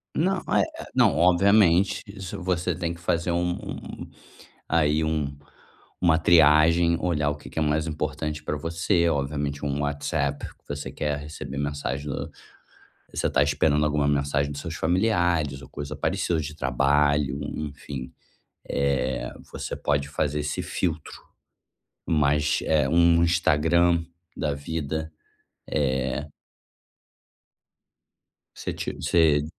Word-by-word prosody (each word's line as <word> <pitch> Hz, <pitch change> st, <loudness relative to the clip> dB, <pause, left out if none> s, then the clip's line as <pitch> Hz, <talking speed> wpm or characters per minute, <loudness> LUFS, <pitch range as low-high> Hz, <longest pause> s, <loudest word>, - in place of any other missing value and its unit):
Não. 185 Hz, +4 st, +1 dB
Eh -, -, +3 dB, 0.2 s
eh -, -, -6 dB
não, 70 Hz, -, +4 dB
obviamente, 90 Hz, +1 st, +4 dB
isso 95 Hz, -2 st, -7 dB
você 90 Hz, -1 st, 0 dB
tem 85 Hz, 0 st, -2 dB
que 85 Hz, -, -14 dB
fazer 85 Hz, 0 st, 0 dB
um 90 Hz, 0 st, 0 dB
um -, -, -8 dB, 0.6 s
aí 80 Hz, -1 st, +2 dB
um 75 Hz, -3 st, -1 dB, 0.6 s
uma 80 Hz, -2 st, +4 dB
triagem, 85 Hz, +1 st, +5 dB
olhar 75 Hz, -5 st, 0 dB
o -, -, -4 dB
que 75 Hz, -, -12 dB
que -, -, -16 dB
é -, -, +1 dB
mais 75 Hz, +1 st, +1 dB
importante 75 Hz, 0 st, -3 dB
pra 75 Hz, -, -2 dB
você. 85 Hz, +2 st, +1 dB
Obviamente 70 Hz, 0 st, -2 dB
um 70 Hz, +1 st, -1 dB
WhatsApp 70 Hz, 0 st, -1 dB
que -, -, -18 dB
você 70 Hz, 0 st, -5 dB
quer 75 Hz, -1 st, -2 dB
receber 70 Hz, -2 st, -7 dB
mensagem 70 Hz, 0 st, -3 dB
do 65 Hz, -, -4 dB, 0.8 s
Você -, -, -1 dB
está -, -, +3 dB
esperando 75 Hz, +1 st, +2 dB
alguma 75 Hz, -1 st, +1 dB
mensagem 70 Hz, 0 st, 0 dB
dos 70 Hz, -, -6 dB
seus 85 Hz, -2 st, -5 dB
familiares 85 Hz, -6 st, +1 dB
ou -, -, -12 dB
coisa 70 Hz, 0 st, -6 dB
parecida 85 Hz, -2 st, 0 dB
de 75 Hz, 0 st, -5 dB
trabalho, 70 Hz, +1 st, +2 dB
enfim. 70 Hz, -3 st, -6 dB, 0.6 s
Eh, 65 Hz, -2 st, 0 dB, 0.2 s
você -, -, -5 dB
pode 70 Hz, -1 st, 0 dB
fazer 75 Hz, 0 st, -1 dB
esse 75 Hz, -, -2 dB
filtro. 80 Hz, -4 st, -3 dB, 0.9 s
Mas, 75 Hz, -1 st, +2 dB
eh, 75 Hz, -4 st, +2 dB
um 85 Hz, 0 st, +4 dB
Instagram 85 Hz, 0 st, +3 dB, 0.3 s
da 75 Hz, -2 st, -1 dB
vida, 80 Hz, +1 st, -4 dB, 0.6 s
eh 65 Hz, 0 st, -1 dB, 2.3 s
Você -, -, -4 dB
tinha, -, -, -5 dB
você 75 Hz, -4 st, +3 dB
75 Hz, 130 wpm, -25 LUFS, 70-85 Hz, 2.3 s, triagem